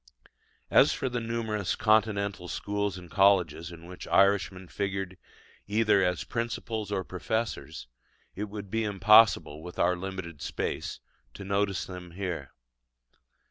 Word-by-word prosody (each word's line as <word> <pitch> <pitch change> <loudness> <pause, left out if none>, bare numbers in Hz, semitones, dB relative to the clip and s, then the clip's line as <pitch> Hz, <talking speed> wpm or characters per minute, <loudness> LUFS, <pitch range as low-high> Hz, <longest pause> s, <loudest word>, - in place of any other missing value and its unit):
As - - +6
for 130 - -2
the 125 0 -2
numerous 115 -4 -2
Continental 105 -4 +1
schools 100 +1 -2
and 90 -1 -10
colleges 90 -5 +3
in 85 -1 -11
which 90 +1 -9
Irishmen 95 -2 +3
figured 95 -1 -3 0.5
either 105 -1 +3
as 90 0 0
principals 115 -3 -3
or 95 -2 -1
professors, 110 - -3 0.5
it 105 - -3
would 100 -1 -8
be 115 0 0
impossible, 100 -6 +5
with 90 +1 -9
our 90 +1 +3
limited 90 -4 -6
space, - - -3 0.4
to 100 - -8
notice 100 0 0
them 90 -2 -9
here. 85 -7 -4
100 Hz, 130 wpm, -28 LUFS, 90-105 Hz, 0.5 s, As